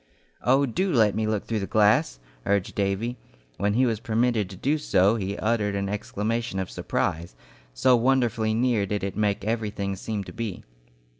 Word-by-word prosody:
"Oh, 135 +3 +3
do 185 +10 -1
let 110 - +4
me 110 0 -1
look 110 -2 -1
through 110 -2 -1
the 100 - -3
glass!" 105 - +3 0.3
urged 100 -1 +1
Davy. 100 +5 -1 0.4
When 100 +1 0
he 130 +2 +4
was 115 -4 0
permitted 115 -3 0
to 95 - -9
do 145 +11 0
so 100 -7 +3
he 100 -2 -3
uttered 105 -3 0
an 100 0 -2
exclamation 105 +2 -2
of 95 -1 -3
surprise, 80 -5 -2 0.4
so 125 - +4
wonderfully 115 -3 +1
near 115 -4 +1
did 105 0 -2
it 100 -1 -3
make 105 -2 0
everything 105 -3 -2
seem 105 +1 -4
to - - -10
be. 115 -5 -5
110 Hz, 175 wpm, -25 LUFS, 100-115 Hz, 0.4 s, let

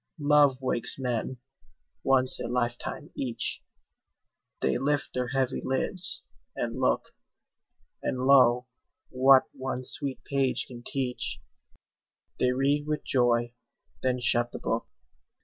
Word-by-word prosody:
Love 145 -3 +3
wakes 125 -2 +2
men, 125 -1 -3 0.7
once 130 -1 +5
a - - -4
lifetime 120 +4 -3
each; 125 -4 -2 1.0
They 65 - 0
lift 145 0 -1
their 125 -1 -2
heavy 130 0 -1
lids, 170 +7 +3 0.3
and - - -4
look; - - 0 0.9
And, - - -2
lo, 125 -2 +4 0.5
what 130 +1 +5
one 130 -1 -5
sweet 140 0 -3
page 135 -2 0
can 120 -2 -11
teach, 130 -2 -3 1.0
They 125 - +2
read 140 +3 0
with 150 0 -2
joy, 120 -2 +1 0.5
then 125 -1 0
shut 120 -1 +1
the - - -6
book. - - -3
130 Hz, 115 wpm, -27 LUFS, 125-135 Hz, 1.0 s, once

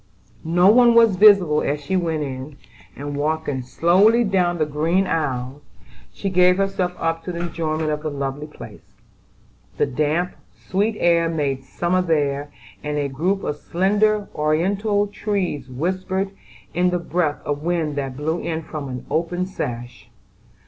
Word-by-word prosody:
No 175 +3 +3
one 240 0 +6
was 230 -4 +6
visible 185 -6 +6
as 145 +1 -1
she 145 +6 -3
went 165 -4 0
in, 135 +1 -6 0.4
and 145 +1 -5
walking 150 -2 -1
slowly 190 - +4
down 180 -4 +1
the 155 - +1
green 160 +6 +1
aisle, 135 -5 -2 0.5
she 195 - -4
gave 180 0 +5
herself 195 -2 -1
up 165 0 -2
to 180 - -4
the 170 -1 -4
enjoyment 160 -2 -2
of 150 0 -2
the 155 - -3
lovely 140 +1 -4
place. 115 -7 -13 0.8
The - - +3
damp, 155 +6 0 0.2
sweet 205 +4 -1
air 170 -1 +3
made 140 -5 -2
summer 175 +7 0
there, 145 -4 0 0.3
and 150 0 -2
a 145 -1 -1
group 180 +9 -1
of 150 - -2
slender, 205 +5 +1
oriental 195 +7 +1
trees 195 -10 -3
whispered 185 +7 -2 0.4
in 180 +1 +2
the 180 - 0
breath 170 -3 -1
of 145 0 -2
wind 165 -3 -1
that 135 -2 -3
blew 160 +4 -1
in 160 -1 -3
from 150 -3 -6
an 125 -1 -6
open 175 +3 0
sash. 120 -9 -6
165 Hz, 155 wpm, -22 LUFS, 145-185 Hz, 0.8 s, one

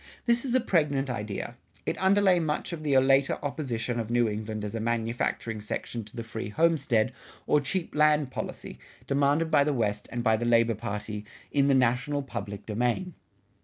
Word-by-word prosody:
This 235 0 +2
is 255 -1 0
a - - +6
pregnant 150 - +1
idea; 105 -4 -4 0.3
it - - -1
underlay 190 -1 +4
much 155 +1 -2
of 165 - -5
the 145 -3 +2
later 135 +1 +4
opposition 125 -5 -2
of 115 -1 -3
New 120 -1 +3
England 110 0 -4
as 105 - -5
a 115 - -2
manufacturing 115 -1 -1
section 115 +2 -4
to 105 - -14
the 115 - -4
free 110 -2 -5
homestead 135 -4 +2 0.3
or 150 - +3
cheap 175 +5 -3
land 150 -2 +3
policy, - - -6 0.3
demanded 145 +4 +2
by 140 - +5
the 150 0 0
West 105 -3 -1
and 120 -1 -3
by 110 -1 +3
the 120 - -3
labor 115 -1 +4
party, 105 0 -5 0.3
in 140 -1 +3
the 140 - +4
national 130 +3 +1
public 100 -5 -6
domain. 120 - -1
125 Hz, 180 wpm, -28 LUFS, 110-150 Hz, 0.3 s, a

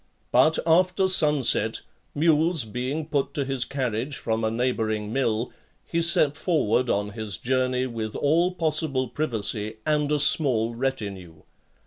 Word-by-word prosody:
But 155 +6 +4
after 180 +3 +3
sun 150 -7 +3
set, 110 -1 +2 0.3
mules 160 -1 +2
being 130 +8 -4
put 145 -2 -2
to 140 -3 +1
his 135 -2 -2
carriage 130 0 -3
from 110 0 -2
a 110 - +1
neighbouring 110 -3 -2
mill, 115 -3 -1 0.3
he 170 - -1
set 155 -3 +2
forward 135 - 0
on 105 +1 -1
his 105 -2 -4
journey 130 +1 0
with 115 -3 -5
all 165 +5 +2
possible 155 -7 -1
privacy, 110 -6 -3
and 150 -1 0
a 150 - +2
small 130 -6 +3
retinue. 100 -10 -5
130 Hz, 140 wpm, -25 LUFS, 110-155 Hz, 0.3 s, But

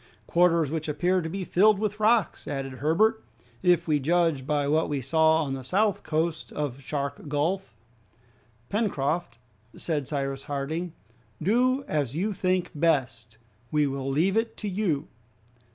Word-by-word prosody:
"Quarters 170 -4 +3
which 160 -1 -3
appear 180 +5 +1
to 160 - -4
be 190 +3 -4
filled 205 +4 +4
with 210 0 -2
rocks," 215 -1 +2
added 135 -3 -4
Herbert, 215 - +2 0.4
"if 175 -2 +3
we 150 -2 +2
judge 160 -2 +1
by 145 -2 +1
what 155 +2 +2
we 145 -2 -1
saw 160 +4 +3
on 135 -2 -3
the 135 -1 -5
south 200 - +1
coast 160 +1 -2
of 140 -3 -3
Shark 140 +2 -4
Gulf." 160 +7 -1 0.9
"Pencroft," 170 - -1 0.4
said 150 -5 -2
Cyrus 135 -2 -3
Harding, 155 +5 -3 0.5
"do 255 - +2
as 145 -4 -1
you 200 +6 -1
think 185 -1 0
best, 130 -8 0 0.3
we 150 -1 +2
will 135 -1 -3
leave 165 +8 +2
it 225 0 0
to 210 - -5
you." 180 -7 -1
160 Hz, 150 wpm, -26 LUFS, 140-185 Hz, 0.9 s, filled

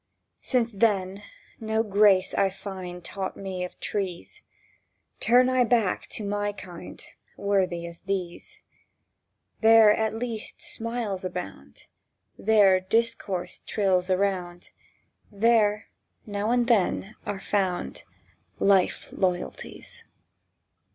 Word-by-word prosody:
Since, 240 -3 +1
then, 200 -2 +1 0.4
no 220 -1 0
grace 200 -3 +4
I 195 - +2
find 185 -2 -8
Taught 190 -1 -5
me 190 -2 -4
of 180 - -8
trees, 190 -4 -4 0.8
Turn 250 +1 +5
I 255 -1 +3
back 225 -5 +1
to 215 - -6
my 205 0 -1
kind, 180 -3 -10 0.3
Worthy 185 -4 0
as 170 0 -9
these. 195 - -4 1.0
There 225 -1 +7
at 220 0 -1
least 225 -2 -5
smiles 230 -5 -4
abound, 170 - -7 0.5
There 205 -3 +4
discourse 200 -2 -1
trills 190 -3 +1
around, 185 -2 -1 0.6
There, 215 0 +3 0.4
now 205 0 -2
and 245 0 +3
then, 215 -2 +1
are 205 -2 -3
found 195 -3 -2 0.6
Life 195 -2 +2
loyalties. 190 - -3
200 Hz, 105 wpm, -26 LUFS, 185-220 Hz, 1.0 s, There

